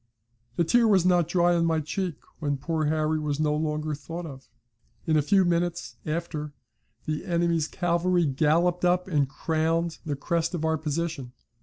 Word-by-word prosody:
The 170 - +2
tear 230 +8 +4
was 190 -5 +4
not 175 -3 +3
dry 175 0 +3
on 170 -1 +2
my 165 -1 +2
cheek 175 +2 -3 0.2
when 145 -3 -1
poor 160 +2 -1
Harry 155 +1 +1
was 150 -1 -2
no 150 -1 +1
longer 155 0 -2
thought 165 +4 -6
of. 135 -4 -10 0.6
In 160 - +2
a 150 - +4
few 190 +6 +3
minutes 170 -8 -1
after, 155 -2 -3 0.5
the 155 0 -2
enemy's 170 -2 +1
cavalry 175 0 +1
galloped 160 +6 +2
up 180 +1 +2
and 145 -7 +1
crowned 165 +3 -1
the 150 -3 -2
crest 165 +4 -1
of 160 -2 -2
our 160 -1 +1
position. 150 -4 -3
160 Hz, 170 wpm, -26 LUFS, 150-175 Hz, 0.6 s, tear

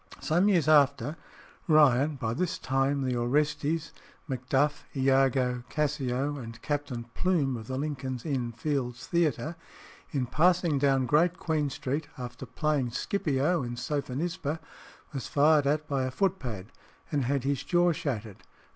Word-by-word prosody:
Some 175 +6 +2
years 170 -7 +3
after, 140 -2 +4 0.5
Ryan, 150 -2 +5
by 115 -4 -2
this 180 +7 -1
time 135 +1 0
the 130 -1 0
Orestes, 150 +5 0 0.3
Macduff, 135 +2 0
Iago, 130 -2 +2
Cassio, 140 -1 -1
and 115 -3 -8
Captain 145 -5 -2
Plume 160 -8 +1
of 110 -2 -7
the 130 - -3
Lincoln's 130 -4 -4
Inn 130 -6 -1
Fields 125 0 -3
Theatre, 160 -3 0 0.5
in 135 -4 -1
passing 165 +2 +2
down 135 -2 +3
Great 165 +7 +3
Queen 155 -4 0
Street, 140 +3 -3
after 125 +1 -7
playing 145 0 0
Scipio 150 - 0
in 120 -1 -4
"Sophonisba," 150 +4 -3 0.5
was 135 -3 -4
fired 150 0 +4
at 150 +1 0
by 135 -2 0
a - - -1
footpad, 130 - -2 0.4
and 145 -4 +1
had 140 0 0
his 140 -1 -1
jaw 175 -1 +3
shattered. 115 - -4
140 Hz, 140 wpm, -28 LUFS, 130-155 Hz, 0.5 s, Ryan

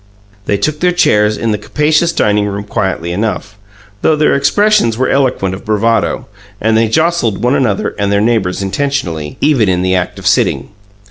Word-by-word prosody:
They 100 - +1
took 150 +9 -2
their 180 +2 +2
chairs 105 -11 +2
in 115 - -1
the 105 - -1
capacious 155 +3 +1
dining 105 -8 +1
room 100 0 -4
quietly 95 -5 -2
enough, 105 +1 -3 0.5
though 155 - +3
their 150 0 +2
expressions 200 - +2
were 130 +1 0
eloquent 125 -9 0
of 95 - -8
bravado, 115 +1 0 0.3
and 110 +1 +1
they 115 0 +3
jostled 155 - 0
one 125 +2 +2
another 115 -8 0
and 100 0 0
their 100 - +2
neighbours 105 -4 0
intentionally, 95 - -3
even 135 -9 +2
in 90 -1 0
the 95 0 +1
act 90 -1 -1
of - - -10
sitting. - - +1
110 Hz, 180 wpm, -13 LUFS, 100-140 Hz, 0.5 s, though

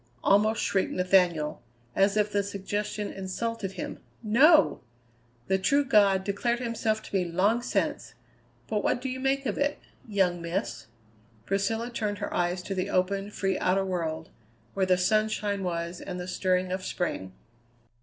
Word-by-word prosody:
almost 215 +2 +3
shrieked 190 - +1
Nathaniel, 180 -4 +2 0.3
as 200 +2 +3
if 210 0 +2
the 205 - +2
suggestion 205 +1 -3
insulted 195 +1 -4
him; 185 - -6 0.2
"no! 290 +9 +5 0.6
The 190 0 +1
true 280 +8 +3
God 200 -6 +4
declared 210 +5 0
himself 230 -3 -1
to - - -7
me 190 - +3
long 190 +7 +1
since. 240 - -2 0.5
But 210 -1 -1
what - - +1
do 260 +1 -4
you 260 +1 -4
make 270 +1 0
of 210 0 -2
it, 285 0 +1 0.3
young 190 -5 +1
Miss?" 170 - -3 0.6
Priscilla 220 - -1
turned 210 -3 -2
her - - -4
eyes 175 +1 0
to 195 - -4
the 185 -1 -2
open, 195 +2 0
free 195 -2 -1
outer 195 +1 +2
world, 165 -3 -3 0.4
where 190 -1 +1
the 185 -1 +4
sunshine 205 +1 +1
was 170 0 -3
and 180 -2 -6
the 180 - -5
stirring 185 0 0
of 185 0 -2
spring. 95 - -3
195 Hz, 155 wpm, -28 LUFS, 185-215 Hz, 0.6 s, no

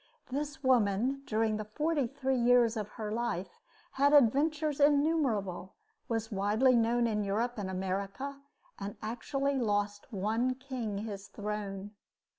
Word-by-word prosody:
This 285 +1 -3
woman 250 +1 +2
during 220 0 +1
the 215 - -3
forty 290 +5 0
three 265 +1 -1
years 240 -1 +4
of 210 -2 -3
her 215 -3 -5
life 195 -6 -3 0.3
had 280 +2 +3
adventures 295 +3 +3
innumerable, 280 - +2 0.3
was 225 -1 -2
widely 215 +6 +3
known 235 +1 +3
in 210 -2 0
Europe 225 +4 -1
and 195 -2 -3
America, 195 +9 -3 0.4
and 200 0 -6
actually 275 +5 -1
lost 205 0 -1
one 225 +5 0
king 250 -6 -4
his 200 -2 -6
throne. 205 -1 -5
230 Hz, 130 wpm, -31 LUFS, 205-270 Hz, 0.4 s, years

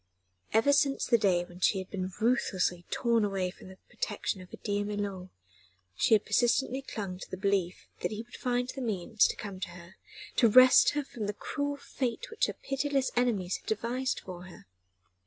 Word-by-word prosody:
Ever 225 +6 +4
since 275 -1 +2
the 235 - +3
day 180 -4 +2
when 175 0 -14
she 195 - +3
had 190 -1 -6
been 185 -1 -3
ruthlessly 190 -7 +1
torn 235 -2 +2
away 195 -3 -1
from 185 - -14
the 190 0 -12
protection 220 - -3
of 180 - -13
her - - -10
dear 205 0 0
milor, 205 -3 -4 0.7
she 220 - +4
had 210 - 0
persistently 245 +5 +2
clung 200 -8 -6
to - - -9
the 185 - -5
belief 195 -2 -1
that - - -1
he 220 +1 -5
would 240 - -14
find 245 0 -1
the 270 - -5
means 215 -2 +2
to - - -3
come 200 -3 -7
to - - -4
her, 180 +2 -13 0.4
to 235 - +6
wrest 255 +3 +7
her 295 - +1
from 225 -6 -6
the 205 - -2
cruel 285 +3 -3
fate 255 - -4
which 445 - +1
her - - -3
pitiless 275 0 -1
enemies 215 -7 +1
had - - -23
devised 240 +5 -1
for 180 -1 -9
her. 180 - -13
210 Hz, 195 wpm, -30 LUFS, 190-250 Hz, 0.7 s, wrest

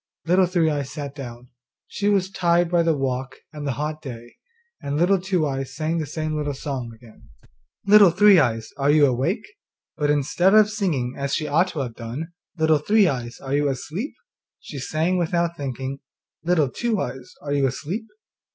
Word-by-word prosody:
Little 180 +2 +4
Three 175 -2 +2
eyes 140 -3 -2
sat 140 0 -6
down; 125 -3 -9 0.4
she 205 0 -1
was 195 -2 +1
tired 175 -2 +2
by 175 -1 +4
the 165 -2 +1
walk 130 0 -2 0.2
and 150 -1 -5
the 135 - 0
hot 150 +3 -4
day, 120 -4 -9 0.4
and 140 +1 -2
Little 180 +3 +3
Two 185 -4 0
eyes 135 -2 -4
sang 160 +2 -1
the 155 - -3
same 155 +1 -3
little 145 -2 -2
song 130 -4 -5
again: 115 -1 -18 0.6
'Little 205 -1 +8
Three 195 +2 +6
eyes, 115 -5 0
are 140 0 +1
you 150 0 +6
awake?' 145 - 0 0.5
but 150 -1 0
instead 150 +7 +3
of 215 -1 +6
singing 160 - -1
as 140 0 -2
she 155 - -2
ought 165 +6 +3
to 170 -5 -4
have 125 -4 -4
done, 120 +8 -6 0.3
'Little 160 -1 +3
Three 205 +6 +4
eyes, 120 -5 -3
are 135 0 -4
you 145 0 +2
asleep?' 155 - -4 0.4
she 145 - -8
sang, 160 +7 0
without 170 0 0
thinking, 135 -1 -5 0.4
'Little 165 -6 +2
Two 235 -4 -1
eyes, 125 -4 -6
are 145 -1 -2
you 140 -1 +2
asleep? 175 - -4
150 Hz, 185 wpm, -23 LUFS, 135-175 Hz, 0.6 s, Little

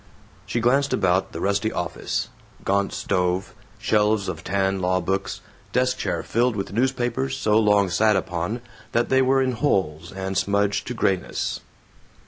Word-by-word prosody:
She 120 - -1
glanced 135 +4 +2
about 95 -1 +2
the 80 - -6
rusty 100 +4 0
office 85 -1 -3 0.4
gaunt 100 +1 +1
stove, 90 -1 -1 0.2
shelves 105 -1 +2
of 85 -2 -5
tan 95 0 0
law 90 0 +1
books, 95 +3 -2 0.3
desk 125 +1 +1
chair - - -1
filled 120 0 +1
with 100 -1 -4
newspapers 130 +2 0
so 110 -4 +3
long 105 -2 +4
sat 105 +4 +3
upon 90 +5 -2 0.3
that 120 0 +1
they 130 0 +4
were 135 +1 +3
in 130 - +1
holes 95 - 0
and 95 0 -4
smudged 100 +2 +1
to 125 - -4
grayness. 95 -5 -1
100 Hz, 150 wpm, -24 LUFS, 95-120 Hz, 0.4 s, long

